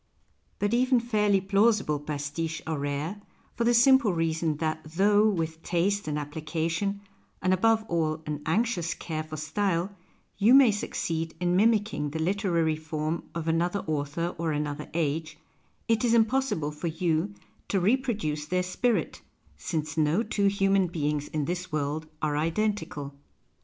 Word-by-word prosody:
But 205 +2 0
even 250 +1 +3
fairly 210 -4 +2
plausible 195 -5 +2
pastiches 150 +2 -4
are 160 -2 -2
rare, 145 +8 -3 0.3
for 235 - -1
the 240 - +4
simple 265 -2 +5
reason 160 -2 0
that 155 0 -2
though, 205 +7 +3
with 165 -4 -2
taste 185 +3 0
and 150 -1 -1
application, 165 +6 -2 0.4
and 185 0 +2
above 220 +3 +3
all 160 -3 -1
an 150 -1 -4
anxious 180 -1 0
care 155 -2 -4
for 155 0 -7
style, 180 +4 -1 0.4
you 225 +6 +6
may 270 -5 +7
succeed 165 -5 -3
in 180 0 +1
mimicking 210 -7 +2
the 155 - -5
literary 170 -2 +1
form 155 +1 -3
of 165 -1 -3
another 175 +4 +1
author 155 +3 -2
or 165 -1 0
another 150 0 -3
age, 155 -1 -1 0.5
it 225 -1 +2
is 235 -1 +3
impossible 225 - +1
for 150 +3 -5
you 165 +3 -1 0.3
to 195 - +1
reproduce 205 - 0
their 180 +2 0
spirit 225 +6 -1 0.2
— - - -32
since 155 -2 -2
no 155 +8 +2
two 205 -3 +1
human 195 -1 +2
beings 150 -3 -2
in 150 -2 -2
this 180 +2 -4
world 150 +1 -2 0.2
arc 150 -1 +1
identical. 165 -4 -2
170 Hz, 150 wpm, -27 LUFS, 155-205 Hz, 0.5 s, may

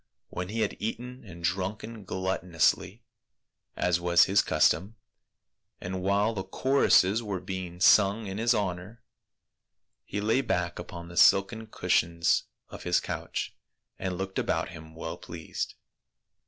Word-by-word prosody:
When 90 +1 -5
he 110 +2 -2
had 105 - -1
eaten 125 +4 -5
and 85 -3 -11
drunken 100 +4 -3
gluttonously,. 95 -3 0 0.7
as 90 -1 +1
was 85 0 +5
his 95 +1 +4
custom, 100 +4 +2 0.8
and 95 +1 -4
while 100 +4 +2
the 95 -3 -3
choruses 110 -1 +3
were 100 -4 -3
being 90 -1 -6
sung 100 +3 +5
in 95 +1 -5
his 120 +1 +3
honor, 100 +2 -3 1.0
he 100 - -4
lay 110 +5 +2
back 90 -8 -1
upon 85 0 -8
the 85 0 -10
silken 110 +3 +4
cushions 85 -5 +1 0.2
of - - -10
his - - +2
couch - - -4 0.4
and 95 -2 -3
looked 95 0 -3
about - - -1
him 80 -1 -11
well 80 +1 -5
pleased. 85 -2 -6
95 Hz, 135 wpm, -28 LUFS, 90-105 Hz, 1.0 s, was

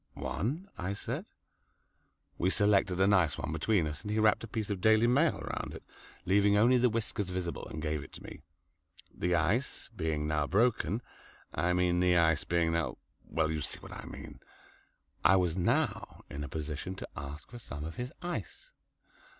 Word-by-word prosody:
"One," 150 - -2
I 95 +2 -2
said. - - -4 1.1
We 90 - +3
selected 100 -2 +3
a 95 - +5
nice 90 -7 +3
one - - -3
between 85 +3 +2
us, 75 0 -4
and 105 - -6
he 105 - 0
wrapped 110 0 +4
a - - -5
piece 110 -1 -3
of 95 -3 -3
"Daily 110 +2 +5
Mail" 140 +7 +4
round - - -4
it, - - -10 0.4
leaving 100 +2 +4
only 120 +4 +5
the 125 +1 +4
whiskers 110 -3 -2
visible, 90 -2 -3
and 75 +2 -6
gave 75 -2 -1
it - - -13
to - - -11
me. - - -10 0.7
The 90 0 +1
ice 100 +14 0
being 80 -4 -1
now 75 -1 +1
broken 110 +1 +2 0.5
I 85 +4 +1
mean 90 -1 +2
the 90 -1 +4
ice 80 -2 +3
being 85 -1 +1
now 85 -2 -1 0.3
well, 80 -1 0
you 80 -1 -2
see - - -2
what - - -11
I - - -8
mean - - -9 0.8
I 85 +4 +7
was 90 -3 +2
now 90 - 0
in 75 0 -4
a 70 - -6
position 80 +4 -4
to - - -7
ask 70 +2 -8
for 120 - -8
some 75 -9 -7
of 80 - -7
his 125 +2 -4
ice. 175 - -5
90 Hz, 185 wpm, -31 LUFS, 80-110 Hz, 1.1 s, I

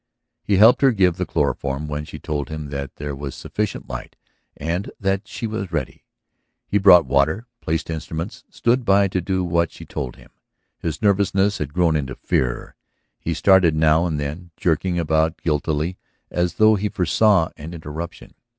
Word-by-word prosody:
He 100 - +1
helped 110 +7 +7
her 135 -2 +6
give 95 -6 +2
the - - -2
chloroform 70 +2 -1
when 75 0 -4
she - - -9
told 75 -4 -4
him 75 -2 -6
that 70 -1 -5
there 70 0 -5
was 70 -1 -6
sufficient 105 -1 -4
light - - -7 0.4
and 85 +6 -2
that 95 +1 -1
she 110 - -5
was 110 -4 -4
ready. 75 -6 -4 0.6
He 105 - +1
brought 90 -4 +7
water, 75 +11 +1 0.2
placed 80 +1 -2
instruments, 80 +3 -5
stood 120 +2 +1
by 100 -2 +4
to 95 0 -1
do 95 +1 -1
what 85 -1 +1
she - - -11
told 65 -4 -5
him. - - -18 0.5
His 80 +1 -4
nervousness 100 -1 +2
had 75 -2 -3
grown 85 0 +2
into 70 -3 -2
fear; 60 -2 -2 0.4
he - - -2
started 95 -5 +5
now 80 +2 +3
and 80 -3 -2
then, 75 +5 -5
jerking 85 +2 0
about 80 0 +1
guiltily, 80 +2 -1 0.3
as 90 0 0
though 110 0 +5
he 105 0 0
foresaw 95 0 +3
an 80 +3 -8
interruption. 80 +1 -7
85 Hz, 170 wpm, -22 LUFS, 75-95 Hz, 0.6 s, helped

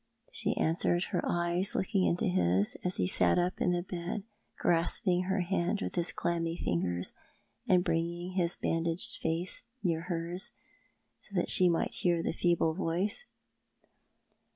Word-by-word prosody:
" - - -48
she - - 0
answered, 175 +2 +2
her - - +1
eyes 175 +2 +2
looking 190 0 +1
into 175 - +1
his, 90 +2 +1
as 180 0 0
he - - +1
sat 90 -1 +3
up 180 +1 0
in 180 - +3
the 175 0 0
bed, 180 +2 -4 0.3
grasping 175 +2 +1
her 190 +1 0
hand 180 +2 0
with - - -4
his 175 -1 +1
clammy 165 -1 -1
fingers, 90 - -2 0.5
and 180 -1 +4
bringing 170 +1 -1
his 175 -2 +1
bandaged 165 +1 -1
face 165 +3 0 0.2
near 165 -4 +1
hers, 170 +1 -2 0.7
so 200 - -12
that 175 - +2
she 180 -1 +6
might 170 - 0
hear 170 -2 +1
the - - -1
feeble 170 -2 +2
voice. 190 - -1
175 Hz, 155 wpm, -31 LUFS, 165-180 Hz, 0.7 s, she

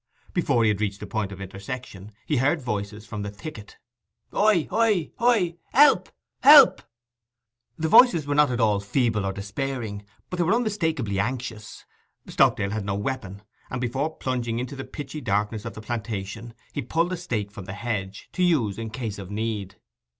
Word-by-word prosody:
Before 140 -9 +2
he 110 - +4
had 105 0 0
reached 100 -1 -1
the - - -6
point 105 -1 -3
of 95 - -9
intersection 100 +1 -7
he 150 - 0
heard 145 +7 +2
voices 105 -4 -4
from 105 -2 -6
the 100 - -4
thicket. 105 +1 -9 0.5
'Hoi 205 -5 +3
hoi 215 -7 +2
hoi! 215 -8 +2 0.2
Help, 290 +4 +6 0.3
help!' 285 -1 +9 1.0
The 160 - -1
voices 170 - +6
were 145 - -1
not 150 -1 +4
at 125 -1 -2
all 105 -3 +3
feeble 105 -1 0
or - - 0
despairing, 105 +1 -4 0.3
but 180 - -3
they 175 - +2
were 185 +7 +3
unmistakably 160 - -1
anxious. 115 -1 -4 0.4
Stockdale 100 0 +2
had 110 -1 -2
no 100 0 -2
weapon, 100 -3 -4 0.3
and 125 - -3
before 135 +6 -2
plunging 120 -3 -2
into 125 +3 -4
the 135 - -6
pitchy 145 +1 -7
darkness 105 +1 -1
of - - -6
the 110 - -8
plantation 110 0 -5 0.2
he 145 - -2
pulled 165 +8 0
a - - -2
stake 115 - -3
from 100 -2 -9
the 95 - -6
hedge, 100 -3 -4
to - - -3
use 125 - +2
in 115 -1 -4
case 110 -3 -5
of 95 -2 -8
need. 105 -2 -3
115 Hz, 180 wpm, -25 LUFS, 100-150 Hz, 1.0 s, help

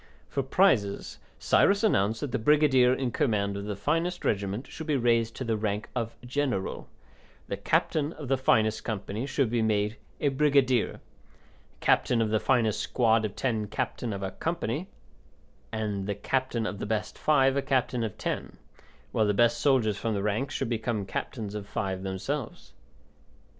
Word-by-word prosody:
For 140 - -1
prizes, 130 - +1 0.2
Cyrus 200 +2 +3
announced 110 - +2
that 145 - -3
the - - -1
brigadier 135 -1 +4
in 130 -1 0
command 100 -5 0
of 100 0 -5
the 105 -1 -3
finest 165 - -1
regiment 100 +4 -1
should 160 +3 -8
be 150 -2 +2
raised 115 -2 +2
to - - -4
the 115 -2 0
rank 105 0 -2
of 115 -2 -2
general, 125 -6 -2 0.6
the - - -2
captain 150 -1 +1
of 150 -3 -8
the 135 - +3
finest 110 -4 +2
company 110 +2 -3
should 135 -4 0
be 120 -1 +1
made 105 0 +1 0.2
a 145 - +2
brigadier, 135 -4 +3
the - - -13 0.9
captain 125 - +3
of 110 -2 +1
the 110 - +3
finest 115 -5 +2
squad 115 -2 +2
of 105 - -5
ten 110 -5 -1
captain 115 +3 -3
of 100 -1 -4
a 95 - -3
company, 160 - -3 0.8
and 105 -3 -2
the 100 - -1
captain 125 +1 -1
of 100 -2 -4
the - - -4
best 110 -1 -2
five 135 -3 +3
a 140 - +2
captain 125 -3 0
of 110 -3 -4
ten, - - -4 0.5
while 110 -2 +2
the 105 - +1
best 120 +2 +3
soldiers 120 -8 +2
from 115 -2 -1
the 100 - -2
ranks 105 +7 -1
should - - -1
become 110 -3 -1
captains 105 +1 -4
of 105 -1 -6
five 95 -2 -3
themselves. 100 +8 -4
115 Hz, 175 wpm, -28 LUFS, 105-135 Hz, 0.9 s, brigadier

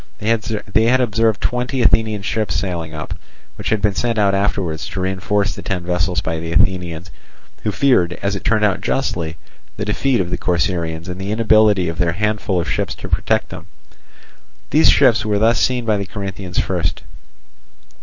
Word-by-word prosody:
They 110 -1 0
had 125 +2 +4
observed 110 -3 +1
twenty 125 +1 -1
Athenian 110 -3 +2
ships 105 -4 -1
sailing 85 -3 -3
up, 75 +2 -5 0.4
which - - -4
had 110 -2 0
been 105 -1 +3
sent 115 +2 -1
out 100 -2 +3
afterwards 95 -6 -1
to - - -5
reinforce 100 +2 0
the - - -8
ten 90 -3 -3
vessels 90 0 0
by 80 0 -3
the 80 0 -5
Athenians, 90 0 0 0.5
who 105 - -1
feared, 100 -8 +3
as 100 0 0
it 100 - -6
turned 110 -1 +2
out 95 -1 0
justly, 85 -9 -2 0.4
the 105 - -3
defeat 120 +4 +1
of 90 -2 -2
the - - -2
Corcyraeans 85 -2 -1
and 90 +1 -6
the 100 +2 -3
inability 110 -4 +4
of 80 0 -4
their 85 -1 +1
handful 105 -1 -1
of 85 - -2
ships - - -2
to - - -8
protect - - +1
them. - - -9 1.0
These - - +5
ships - - +5
were 105 -1 0
thus 115 +3 +3
seen 125 -2 +1
by 110 -2 +2
the 100 -1 -4
Corinthians 95 -3 -6
first. 85 -4 -1
100 Hz, 180 wpm, -19 LUFS, 90-110 Hz, 1.0 s, These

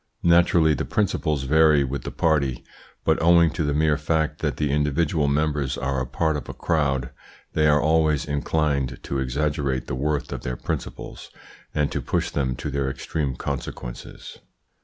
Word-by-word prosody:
Naturally 85 -2 +5
the 70 - -1
principles 80 -8 0
vary 75 +1 +4
with 70 +1 -3
the - - -5
party; 70 -6 +1 0.4
but 80 0 +2
owing 85 -1 +5
to 80 - -2
the 75 - 0
mere 75 -1 +3
fact 80 +1 0
that - - -2
the 75 -2 0
individual 75 +1 +1
members 70 -2 0
are 65 0 -1
a 65 - -3
part 80 +5 0
of 75 - -5
a - - -6
crowd, 70 -6 0 0.4
they 75 0 +3
are 75 0 +5
always 80 -1 +2
inclined 70 -3 0
to 70 - -2
exaggerate 70 0 -1
the - - -5
worth 75 +2 -1
of - - -5
their 60 0 -4
principles, - - -6 0.5
and 75 -1 +1
to - - -2
push - - -1
them 65 -3 -1
to 75 - -5
their 70 -1 -1
extreme 65 0 -3
consequences. - - -6
75 Hz, 170 wpm, -24 LUFS, 70-80 Hz, 0.5 s, Naturally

